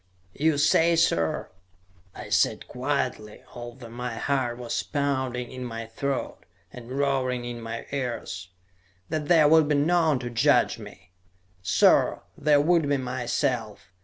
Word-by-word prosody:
"You 155 Hz, 0 st, +1 dB
say, 165 Hz, +3 st, +4 dB
sir," 85 Hz, -, +1 dB, 0.6 s
I -, -, -8 dB
said -, -, +1 dB
quietly, 125 Hz, -5 st, -3 dB
although 120 Hz, 0 st, -9 dB
my 120 Hz, 0 st, -5 dB
heart 130 Hz, -2 st, -1 dB
was 120 Hz, -1 st, -2 dB
pounding 130 Hz, -4 st, -2 dB
in 130 Hz, -1 st, -6 dB
my 115 Hz, -2 st, -5 dB
throat, 135 Hz, +4 st, -3 dB, 0.3 s
and 120 Hz, -1 st, -10 dB
roaring 130 Hz, -3 st, 0 dB
in 120 Hz, -1 st, -6 dB
my 115 Hz, 0 st, -6 dB
ears, 120 Hz, -9 st, -4 dB, 0.6 s
"that 155 Hz, -2 st, -2 dB
there 160 Hz, -3 st, +6 dB
would 160 Hz, 0 st, +5 dB
be 150 Hz, -, +2 dB
none 160 Hz, 0 st, +3 dB
to 120 Hz, -1 st, -5 dB
judge 115 Hz, -, +3 dB
me. -, -, -13 dB, 0.5 s
"Sir, 90 Hz, -, +3 dB
there 150 Hz, -1 st, +3 dB
would 165 Hz, -1 st, +2 dB
be 145 Hz, -, +2 dB
myself. 120 Hz, -4 st, -2 dB
130 Hz, 135 wpm, -26 LUFS, 120-145 Hz, 0.6 s, there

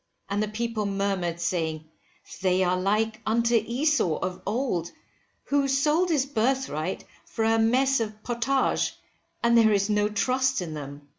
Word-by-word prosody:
And 205 Hz, +1 st, 0 dB
the 215 Hz, -, 0 dB
people 215 Hz, 0 st, -2 dB
murmured, 195 Hz, -4 st, -1 dB
saying, 160 Hz, -2 st, -2 dB, 0.6 s
they 185 Hz, 0 st, +2 dB
are 180 Hz, 0 st, +2 dB
like 215 Hz, +4 st, 0 dB
unto 230 Hz, +2 st, +1 dB
Esau 235 Hz, -, +1 dB
of 185 Hz, 0 st, -4 dB
old, 210 Hz, -7 st, -1 dB, 0.5 s
who 280 Hz, -1 st, +1 dB
sold 300 Hz, +6 st, +2 dB
his 290 Hz, -5 st, +2 dB
birthright 230 Hz, -, -1 dB, 0.2 s
for 225 Hz, -, -2 dB
a 225 Hz, 0 st, +3 dB
mess 260 Hz, +4 st, +3 dB
of 215 Hz, -1 st, -5 dB
potage, 245 Hz, +3 st, 0 dB, 0.5 s
and 235 Hz, 0 st, +4 dB
there 225 Hz, -2 st, +6 dB
is 200 Hz, 0 st, +1 dB
no 210 Hz, 0 st, +2 dB
trust 260 Hz, +4 st, +1 dB
in 170 Hz, -4 st, -5 dB
them. 145 Hz, -1 st, -8 dB
220 Hz, 150 wpm, -26 LUFS, 185-255 Hz, 0.6 s, there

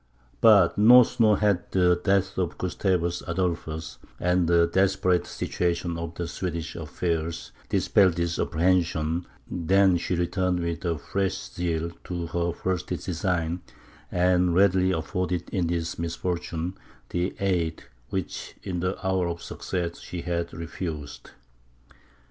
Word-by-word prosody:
But 100 Hz, -5 st, +6 dB
no 125 Hz, +4 st, +9 dB
sooner 110 Hz, -3 st, +3 dB
had 100 Hz, -3 st, +1 dB
the 90 Hz, -1 st, +4 dB
death 95 Hz, +1 st, +1 dB
of 90 Hz, -2 st, -1 dB
Gustavus 90 Hz, 0 st, 0 dB
Adolphus, 85 Hz, -3 st, -2 dB, 0.2 s
and 90 Hz, -1 st, +2 dB
the 85 Hz, 0 st, +5 dB
desperate 95 Hz, 0 st, +2 dB
situation 85 Hz, -1 st, -1 dB
of 85 Hz, 0 st, -5 dB
the 85 Hz, -1 st, -3 dB
Swedish 85 Hz, -1 st, -4 dB
affairs, 80 Hz, 0 st, -3 dB, 0.2 s
dispelled 95 Hz, -4 st, +3 dB
this 85 Hz, 0 st, -1 dB
apprehension, 85 Hz, -1 st, +1 dB, 0.2 s
than 95 Hz, +1 st, +3 dB
she 90 Hz, -, -1 dB
returned 90 Hz, +1 st, 0 dB
with 85 Hz, 0 st, -3 dB, 0.2 s
fresh 95 Hz, -1 st, -1 dB, 0.2 s
zeal 85 Hz, -1 st, -1 dB
to 85 Hz, -2 st, -3 dB
her 85 Hz, +1 st, -1 dB
first 90 Hz, +1 st, -2 dB
design, 85 Hz, 0 st, -2 dB, 0.5 s
and 90 Hz, -1 st, +3 dB
readily 95 Hz, -1 st, +4 dB
afforded 90 Hz, +1 st, -2 dB
in 90 Hz, -4 st, 0 dB
this 85 Hz, -1 st, -2 dB
misfortune 85 Hz, 0 st, -3 dB, 0.4 s
the 90 Hz, +1 st, -1 dB
aid 85 Hz, -4 st, 0 dB, 0.3 s
which 95 Hz, -2 st, -4 dB
in 90 Hz, -2 st, -3 dB
the 90 Hz, +2 st, -1 dB
hour 95 Hz, -2 st, +1 dB
of 85 Hz, 0 st, -5 dB
success 85 Hz, -2 st, -4 dB
she 85 Hz, -1 st, -6 dB
had 85 Hz, -1 st, -2 dB
refused. 80 Hz, -3 st, -6 dB
90 Hz, 125 wpm, -26 LUFS, 85-95 Hz, 0.5 s, no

